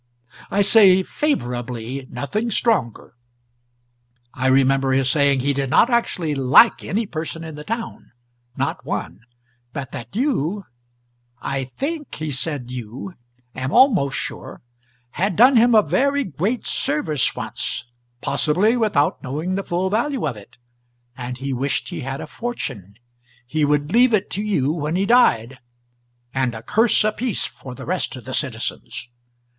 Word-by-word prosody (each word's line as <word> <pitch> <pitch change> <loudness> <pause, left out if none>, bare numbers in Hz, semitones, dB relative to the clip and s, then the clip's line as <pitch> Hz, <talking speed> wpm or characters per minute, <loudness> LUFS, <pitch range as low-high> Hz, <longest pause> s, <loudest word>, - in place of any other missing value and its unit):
I 205 - +2
say 195 -3 +7
'favourably' 125 - -3
nothing 205 - -3
stronger. 220 - 0 1.2
I 130 0 -1
remember 135 0 +3
his 130 -1 +2
saying 140 -2 +3
he 140 +2 +1
did 135 -1 -2
not 235 - +4
actually 180 -9 0
LIKE 135 - +5
any 220 +4 -1
person 165 -2 -5
in 160 -1 -7
the 150 0 -8
town 230 +6 -5 0.5
not - - -2
one; - - -4 0.5
but 135 -3 -5
that 120 - -8
you 205 - 0 0.7
I 135 -1 -3
THINK 290 - -5
he 155 -1 -4
said 130 -1 -2
you 125 - -7 0.4
am 130 +1 -3
almost 190 - +4
sure - - -6 0.5
had 185 +5 -1
done 255 +7 +6
him 235 0 +5
a 215 - +6
very 280 - +1
great 200 - -2
service 150 -2 0
once, - - -4 0.4
possibly 190 +10 +2
without 210 -11 +1
knowing 150 +7 -3
the 195 - -1
full 185 +2 -1
value 245 - 0
of 130 - -3
it, 105 +4 -15 0.6
and 125 -1 -6
he 135 +1 -3
wished 135 +3 -1
he 175 -3 -5
had 135 +1 -5
a - - -5
fortune, 135 - -6 0.5
he 155 +5 -1
would 145 +1 +1
leave 240 -1 +5
it 195 - -2
to 200 - -1
you 170 -10 0
when 155 0 -2
he 190 +2 +1
died, 130 - +3 0.7
and 130 -3 0
a 110 - -8
curse 225 0 +3
apiece 215 +2 -1
for 130 -2 -9
the - - -9
rest - - -2
of - - -11
the - - -6
citizens. - - -3
155 Hz, 150 wpm, -21 LUFS, 130-215 Hz, 1.2 s, say